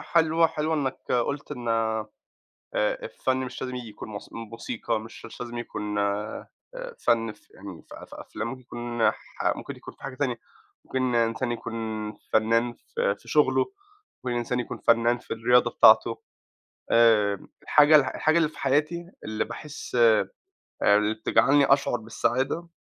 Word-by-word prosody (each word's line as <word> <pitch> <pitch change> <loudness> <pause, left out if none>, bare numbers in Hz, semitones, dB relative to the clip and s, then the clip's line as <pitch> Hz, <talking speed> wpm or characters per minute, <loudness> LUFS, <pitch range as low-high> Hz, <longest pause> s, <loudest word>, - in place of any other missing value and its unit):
حلو، 165 0 +5
حلو 160 0 -1
إنّك 135 -4 -3
قُلت 140 +4 -1
إن 120 -4 -6
آآ، 110 -1 0 0.7
الفن - - -1
مش 130 -1 -5
لازم 130 -1 -4
ييجي 120 -3 -6
يكون 105 - -9
موس 105 -1 -8
موسيقى 115 0 -4
مش 110 +2 -11
مش 115 - -10
لازم 120 -1 -5
يكون 105 -3 -4
آآ، 100 +1 -2 0.5
فن 115 -1 +2
فيعني 95 -4 -12
ف - - -8
ف - - -10
في - - -9
أفلام 110 - -5
ممكن 120 -2 -6
نح 115 - +2 0.4
ممكن - - -7
يكون - - -11
في - - -21
حاجة 135 - -6
تانية، 125 -3 -1 0.5
ممكن 130 -2 -1
إنسان 115 +1 +1
يكون 120 0 -5 0.6
فنان 115 +2 +3
ف 465 - -11
في - - 0
شغلُه، - - +2 0.5
ممكن 125 -1 -1
إنسان 120 +1 -1
يكون 120 - -4
فنان 115 +1 +3
في 120 - -16
الرياضة 125 +2 +3
بتاعتُه، - - +5 0.7
آآ، 105 -4 +4 0.2
الحاجة 150 +1 +6
الح 145 - +3
الحاجة 155 +2 +3
اللي 165 -2 +3
في - - -15
حياتي 155 +6 0
اللي 110 0 -2
باحس 140 +3 -7
ب 115 -3 +5 0.5
اللي 105 +1 +4
بتجعلني 135 +5 +3
أشعر 135 -3 +3
بالسعادة 130 +8 -1
120 Hz, 155 wpm, -26 LUFS, 115-140 Hz, 0.7 s, الحاجة